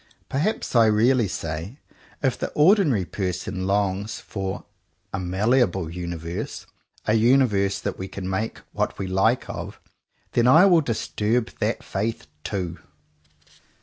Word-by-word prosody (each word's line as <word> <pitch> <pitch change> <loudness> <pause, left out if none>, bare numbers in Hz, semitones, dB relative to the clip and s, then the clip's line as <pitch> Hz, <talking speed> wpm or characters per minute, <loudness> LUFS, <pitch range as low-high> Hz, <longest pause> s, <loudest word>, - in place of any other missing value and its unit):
Perhaps 155 - -1
I 115 -1 +6
really 115 +2 +3
say 80 - -5 0.5
"if 130 -3 +2
the - - -3
ordinary 150 - +4
person 95 +1 -3
longs 100 +1 0
for 95 -2 -5 0.5
a 100 - -1
malleable 95 -1 +1
universe, 85 -1 -5 0.4
a 110 - +2
universe 110 -5 +3
that 100 -2 -4
we 95 - -4
can 95 -1 -6
make 95 +4 -2
what - - -2
we 95 - -3
like 95 +6 +1
of, - - -6 0.3
— - - -43
then 120 0 +3
I 160 +9 +8
will 175 -4 +6
dis 115 -7 -2
turb 110 +2 0
that - - -1
faith 105 -1 -3 0.2
too!" 90 -5 -3
105 Hz, 140 wpm, -24 LUFS, 95-120 Hz, 0.5 s, I